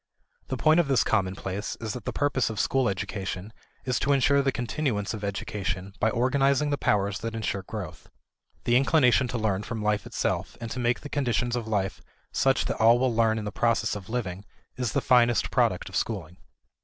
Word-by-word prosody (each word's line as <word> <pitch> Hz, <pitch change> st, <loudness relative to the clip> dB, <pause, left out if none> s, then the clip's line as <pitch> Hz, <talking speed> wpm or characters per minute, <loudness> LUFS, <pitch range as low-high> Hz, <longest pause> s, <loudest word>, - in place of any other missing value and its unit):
The -, -, -3 dB
point 155 Hz, +2 st, +4 dB
of 170 Hz, -, +2 dB
this 135 Hz, -3 st, +3 dB
commonplace 95 Hz, -1 st, -2 dB
is 110 Hz, -2 st, -4 dB
that 125 Hz, -, -8 dB
the -, -, -2 dB
purpose 145 Hz, -4 st, 0 dB
of 110 Hz, -2 st, -4 dB
school 130 Hz, -4 st, +2 dB
education 100 Hz, +1 st, -4 dB, 0.3 s
is 125 Hz, -1 st, 0 dB
to 140 Hz, -, +2 dB
insure 140 Hz, +1 st, +4 dB
the 135 Hz, -1 st, +1 dB
continuance 120 Hz, -5 st, -2 dB
of 105 Hz, -2 st, -6 dB
education 95 Hz, -2 st, -3 dB
by 110 Hz, -, +3 dB
organizing 135 Hz, +4 st, +2 dB
the 145 Hz, -, +1 dB
powers 100 Hz, -1 st, +1 dB
that 115 Hz, 0 st, -4 dB
insure 110 Hz, -3 st, -2 dB
growth. 90 Hz, -6 st, -8 dB, 0.5 s
The 120 Hz, -, +2 dB
inclination 135 Hz, -2 st, +4 dB
to 120 Hz, -, -3 dB
learn 105 Hz, -3 st, 0 dB
from 110 Hz, 0 st, -5 dB
life 105 Hz, -1 st, 0 dB
itself -, -, -2 dB
and 115 Hz, -1 st, -6 dB
to 125 Hz, -, -4 dB
make 120 Hz, 0 st, +1 dB
the -, -, -7 dB
conditions 125 Hz, -4 st, 0 dB
of 120 Hz, -2 st, -3 dB
life 100 Hz, -3 st, -1 dB, 0.3 s
such 135 Hz, 0 st, +2 dB
that -, -, -2 dB
all 115 Hz, +2 st, +7 dB
will 125 Hz, -1 st, +1 dB
learn 110 Hz, -1 st, +2 dB
in 110 Hz, -, -4 dB
the 105 Hz, -, -3 dB
process 115 Hz, -2 st, +1 dB
of 100 Hz, -1 st, -8 dB
living 100 Hz, -6 st, -3 dB, 0.3 s
is 125 Hz, -3 st, -2 dB
the -, -, +1 dB
finest 120 Hz, -3 st, +3 dB
product -, -, +1 dB
of -, -, -8 dB
schooling. 90 Hz, -6 st, -3 dB
115 Hz, 200 wpm, -27 LUFS, 100-125 Hz, 0.5 s, all